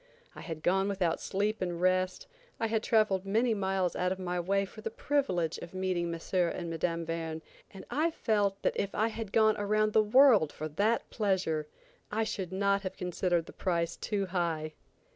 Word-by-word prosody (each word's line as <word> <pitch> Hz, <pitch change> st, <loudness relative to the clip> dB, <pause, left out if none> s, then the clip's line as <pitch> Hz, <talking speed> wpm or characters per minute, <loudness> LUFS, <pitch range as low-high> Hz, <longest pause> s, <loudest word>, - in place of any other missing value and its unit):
I -, -, -10 dB
had 160 Hz, -2 st, -7 dB
gone 190 Hz, +2 st, +2 dB
without 185 Hz, -5 st, 0 dB
sleep 205 Hz, +3 st, -1 dB
and 175 Hz, -2 st, -2 dB
rest; 185 Hz, 0 st, +1 dB, 0.3 s
I 225 Hz, -, 0 dB
had 220 Hz, -1 st, 0 dB
traveled 215 Hz, -5 st, +2 dB
many 225 Hz, +4 st, +2 dB
miles 190 Hz, -3 st, 0 dB
out 180 Hz, 0 st, 0 dB
of 190 Hz, -, -1 dB
my 180 Hz, -1 st, -2 dB
way 195 Hz, +3 st, +1 dB
for 215 Hz, +3 st, -12 dB
the 225 Hz, -, -3 dB
privilege 220 Hz, -, 0 dB
of 170 Hz, +2 st, -10 dB
meeting 185 Hz, -2 st, -1 dB
M. 165 Hz, -, -4 dB
and 175 Hz, -1 st, 0 dB
Mme. 165 Hz, 0 st, -1 dB
Verne, 165 Hz, -1 st, -4 dB, 0.3 s
and 195 Hz, -, -11 dB
I 315 Hz, +3 st, +2 dB
felt 205 Hz, -9 st, 0 dB
that -, -, +2 dB
if 200 Hz, -, -2 dB
I 220 Hz, +2 st, +2 dB
had 225 Hz, -2 st, -6 dB
gone 220 Hz, -1 st, +4 dB
around 215 Hz, +1 st, +1 dB
the 220 Hz, -, +6 dB
world 215 Hz, -, +5 dB
for 155 Hz, -, -5 dB
that 210 Hz, +9 st, +1 dB
pleasure, 185 Hz, -8 st, 0 dB, 0.4 s
I 220 Hz, +1 st, +1 dB
should 190 Hz, -4 st, -4 dB
not 200 Hz, +1 st, +1 dB
have 185 Hz, -2 st, -5 dB
considered 180 Hz, -1 st, 0 dB
the -, -, -12 dB
price 170 Hz, -3 st, -1 dB
too 205 Hz, -3 st, -2 dB
high. 165 Hz, -4 st, -2 dB
190 Hz, 190 wpm, -30 LUFS, 175-215 Hz, 0.4 s, the